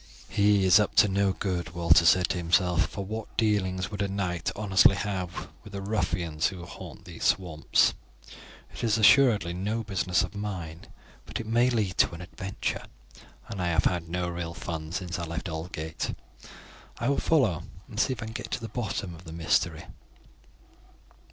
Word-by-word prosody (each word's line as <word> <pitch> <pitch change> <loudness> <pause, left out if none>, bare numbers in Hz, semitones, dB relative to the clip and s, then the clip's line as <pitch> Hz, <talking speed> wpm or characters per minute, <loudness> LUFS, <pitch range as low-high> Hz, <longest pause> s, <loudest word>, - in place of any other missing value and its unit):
"He 100 -1 +3
is 95 +2 +7
up 105 - 0
to - - +7
no 100 0 +2
good," 90 -5 -3
Walter 85 0 +5
said 90 +1 +5
to - - -1
himself, 90 +1 +2
"for 100 - -5
what 110 +2 -6
dealings 95 -5 +1
could 105 -1 -4
a 100 - +1
knight 95 -4 -2
honestly 100 -1 +5
have 95 -3 -3 0.2
with 105 - -12
the 100 - -4
ruffians 85 -6 0
who 90 -4 -7
haunt - - -10
these - - -9
swamps. 85 -5 +2 0.8
It - - -7
is 115 -1 +2
assuredly 110 -6 +5
no 105 +6 -2
business 95 -3 +1
of 95 - -5
mine, 90 -6 -6 0.4
but - - -4
it 115 - -5
may 120 +3 +3
lead 110 -6 -1
to 85 - +4
an 85 - -9
adventure, 95 +2 -4 0.6
and 95 - -5
I 90 - 0
have 85 -2 +2
had 85 -2 0
no 90 +1 -1
real 85 -1 -4
fun 80 -2 -5
since 85 -1 -3
I 85 - -3
left 85 +3 -4
Aldgate. 80 -1 -4 0.8
I - - -2
will 140 - +2
follow 120 - +2 0.3
and 110 -4 -7
see 130 - +3
if 115 - -6
I - - -5
can 110 - -7
get 115 -3 -6
to - - -1
the 115 - -7
bottom 105 -5 -3
of 85 +2 -13
the 80 - -9
mystery." 80 -1 0
95 Hz, 185 wpm, -28 LUFS, 85-105 Hz, 0.8 s, is